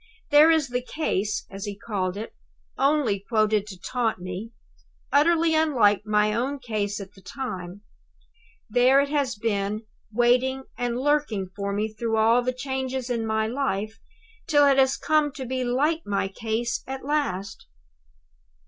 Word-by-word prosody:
There 295 +2 +8
is 315 -4 +3
the 250 0 -1
Case, 215 -7 -2
as 195 +1 -6
he 205 -1 -5
called 195 -3 -3
it 220 - -6 0.4
only 275 -8 +2
quoted 215 0 +1
to 190 -3 -9
taunt 240 +2 -1
me; 185 +5 -6 0.6
utterly 325 +3 +4
unlike 235 -10 +3
my 210 0 +2
own 260 +6 -1
case 215 -5 -3
at 200 0 -9
the 195 - -17
time 190 -7 -6 0.9
there 250 +4 +4
it 280 0 +1
has 280 -5 0
been, 210 0 -2 0.3
waiting 250 +3 +2
and 245 -1 -2
lurking 265 -10 0
for 200 0 -3
me 210 +2 0
through 225 0 -1
all 225 +3 +4
the 250 +1 -1
changes 260 -1 -3
in 230 -2 -1
my 220 0 +1
life, 220 -3 -2 0.5
till 290 -3 +5
it 275 -1 +4
has 265 +1 +3
come 305 -1 +2
to 265 - -6
be 255 +1 -2
like 290 +7 +1
my 200 -1 -1
case 225 +3 -3
at 265 0 -6
last. 200 -10 -2
235 Hz, 155 wpm, -25 LUFS, 210-270 Hz, 0.9 s, There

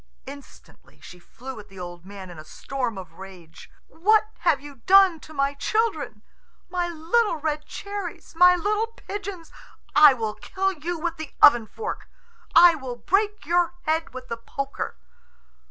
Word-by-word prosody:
Instantly 280 0 -14
she 180 - -13
flew 255 +7 -10
at 210 0 -13
the 195 -1 -13
old 175 0 -9
man 195 -2 -9
in 170 - -11
a - - -9
storm 245 +7 -4
of 180 -3 -11
rage. 185 -4 -12 0.2
"What 430 +5 +2
have - - +2
you 285 -1 -12
done 385 -3 +6
to 310 - -14
my 275 -1 0
children, 315 - -1 0.5
my 355 -1 -1
little 345 +6 +1
red 305 -1 -3
cherries, 400 -5 -7
my 360 +2 +7
little 420 +5 0
pigeons? 400 -6 -8 0.4
I 300 -3 +8
will 220 -3 -3
kill 385 - -2
you 345 0 -4
with 335 +1 -3
the 315 -2 -8
oven 240 -5 +7
fork! 445 - -6 0.5
I 345 0 +9
will 265 -6 -6
break 410 - 0
your 350 +2 +1
head 320 +1 -1
with 255 0 -9
the 230 - -4
poker!" 275 - -5
315 Hz, 160 wpm, -24 LUFS, 240-365 Hz, 0.5 s, I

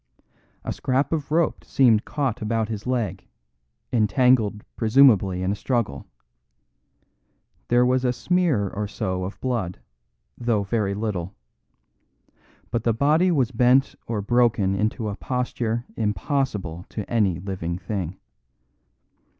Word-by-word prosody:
A - - -3
scrap 130 +5 0
of 150 -2 -3
rope 165 +1 +1
seemed 115 -5 +3
caught 135 -5 -2
about 110 0 -1
his 110 +1 -5
leg, 105 -8 -2 0.7
entangled 110 -1 +3
presumably 110 -6 +4
in 95 - 0
a - - -1
struggle. 110 - -2 1.6
There 120 +1 +4
was 130 +1 +2
a 125 - +2
smear 160 - +1
or 105 +2 -4
so 95 -2 -3
of 95 - -7
blood, 115 -9 -2 0.6
though 115 -4 0
very 100 -1 -1
little; 100 -3 -3 1.4
but 115 0 -1
the 115 - +2
body 150 +9 +3
was 135 -8 +1
bent 125 +3 +3
or 110 -3 -2
broken 115 -4 +2
into 110 +2 -1
a 100 - -3
posture 120 -1 -2
impossible 105 - -2
to 105 - -5
any 105 -7 +1
living 90 -3 -4
thing. 95 -3 -4
115 Hz, 125 wpm, -24 LUFS, 100-125 Hz, 1.6 s, presumably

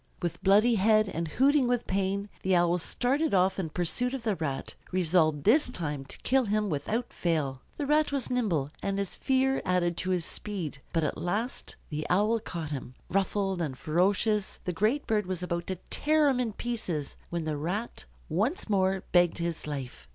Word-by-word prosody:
With 170 -1 -3
bloody 210 +5 +5
head, 215 0 +5
and 165 -3 -3
hooting 270 - +3
with 245 -1 0
pain, 195 +1 -1
the 185 0 +2
Owl 175 0 +3
started 265 - 0
off 190 +1 +3
in 170 -4 -2
pursuit 245 - 0
of 260 - -6
the 215 -3 +1
Rat, 145 -6 -3 0.2
resolved 160 -5 +2
this 265 +6 +4
time 150 - -3
to - - -9
kill 265 -1 +3
him 210 -1 0
without 210 +12 -2
fail. 145 -6 -1 0.2
The 290 - -2
Rat 300 +1 +3
was 275 -3 -2
nimble, 175 - 0
and 195 0 -1
his 200 -2 -2
fear 265 0 +1
added 175 -2 +1
to 185 +2 -1
his 180 -3 +1
speed, 175 -9 -5
but 165 -2 +1
at - - -2
last 215 +8 -2 0.2
the 150 0 -3
Owl 210 +5 +3
caught 170 -8 -5
him. 130 -3 -5
Ruffled 195 0 0
and 140 -6 -3
ferocious, 195 +6 +1
the 180 - -1
great 220 - +1
bird 210 -3 0
was 185 -1 -3
about 170 -1 -2
to 190 - -1 0.2
tear 305 -1 +3
him 260 -2 +1
in 235 -4 -1
pieces, 185 - -3
when 170 -1 -2
the 155 -1 -2
Rat 180 +10 -3 0.2
once 215 - 0
more 190 -2 +1
begged 175 -1 +4
his 170 -2 -3
life. 130 - -6
190 Hz, 190 wpm, -29 LUFS, 165-225 Hz, 0.2 s, bloody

